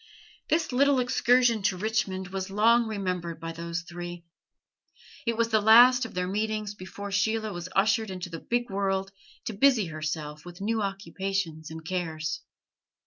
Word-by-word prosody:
This 320 -2 +1
little 275 +1 +4
excursion 245 -2 +3
to 195 -1 +1
Richmond 195 -3 -1
was 190 +1 -4
long 230 +4 +4
remembered 180 -6 -3
by 165 0 -5
those 170 +1 -4
three. 175 0 -8 1.0
It 230 -1 +1
was 230 0 +2
the 220 -1 +3
last 245 +4 +7
of 225 - -9
their 180 0 -1
meetings 215 +1 -2
before 200 +1 -8
Sheila 215 +1 0
was 175 +1 -6
ushered 215 +2 +2
into 185 -1 -6
the 165 - -5
big 240 +2 -2
world 195 0 -1 0.3
to 225 - -3
busy 230 0 +4
herself 155 -1 -4
with 175 0 -11
new 220 +2 0
occupations 195 -4 -3
and 160 0 -9
cares. 160 -3 -3
195 Hz, 155 wpm, -27 LUFS, 175-220 Hz, 1.0 s, last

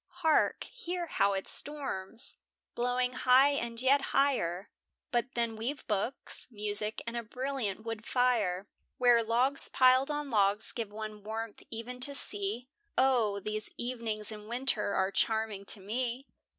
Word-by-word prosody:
Hark, 315 -1 +3
hear 360 -7 -4
how 200 -11 +2
it 190 0 -3
storms! 240 -8 -1 0.4
blowing 250 +1 0
high 260 +3 +5
and 235 -4 -2
yet 270 +3 +4
higher; 200 -10 0 0.4
But 240 +2 -1
then 235 -1 0
we've 250 +6 -4
books, 215 +4 -1
music, 210 -1 -2
and 230 0 -5
a 235 - -1
brilliant 240 -3 -3
wood 225 -1 -5
fire, 220 -7 +1 0.3
Where 245 -2 +5
logs 245 +5 +1
piled 255 +2 +5
on 295 -2 -3
logs 205 -1 +3
give 225 -4 -4
one 215 0 -7
warmth 220 0 -5
e'en 235 +2 -6
to 280 +2 +2
see; 210 0 +1 0.3
Oh! 240 -6 +3
these 215 +1 -3
evenings 230 -3 -2
in 210 -1 -9
winter 235 -4 +1
are 190 +1 +1
charming 220 -2 0
to 205 - -7
me. 240 +6 -3
230 Hz, 145 wpm, -31 LUFS, 210-255 Hz, 0.4 s, high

